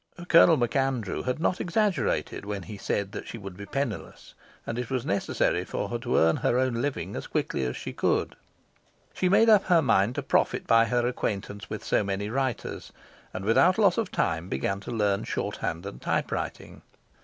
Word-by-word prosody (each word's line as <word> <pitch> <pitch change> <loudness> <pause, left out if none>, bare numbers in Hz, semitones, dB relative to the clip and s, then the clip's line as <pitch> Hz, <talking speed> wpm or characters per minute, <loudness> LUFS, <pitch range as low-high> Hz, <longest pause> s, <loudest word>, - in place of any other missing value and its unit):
Colonel 165 -1 +7
MacAndrew 125 -3 0
had 125 +3 -1
not 180 +3 0
exaggerated 180 - 0
when 100 -2 -4
he 105 - -8
said 100 0 -3
she - - -6
would 95 -4 -8
be 100 +2 -9
penniless, 135 -3 -4 0.3
and 115 +1 -3
it 125 - -4
was 130 -2 -2
necessary 100 -4 0
for - - -4
her - - -3
to - - 0
earn 80 0 +4
her 120 - +1
own 125 -2 +1
living 105 - -3
as - - -5
quickly - - -1
as 60 - -3
she - - -6
could. - - 0 0.8
She 185 - +1
made 215 +4 +5
up 215 -3 +6
her 170 -3 +4
mind 100 +6 +2
to - - -2
profit - - +1
by 115 0 +5
her 120 +2 +1
acquaintance 105 -4 -3
with - - -5
so - - +2
many 100 +1 -3
writers, 130 -2 -3 0.4
and 95 - -6
without 170 - +4
loss 200 -2 +4
of 220 -5 -2
time 80 +3 -1
began 95 +9 -1
to 100 - -8
learn 105 -4 +1
shorthand 85 +3 -3
and 100 - -8
typewriting. - - -3
115 Hz, 185 wpm, -27 LUFS, 100-135 Hz, 0.8 s, Colonel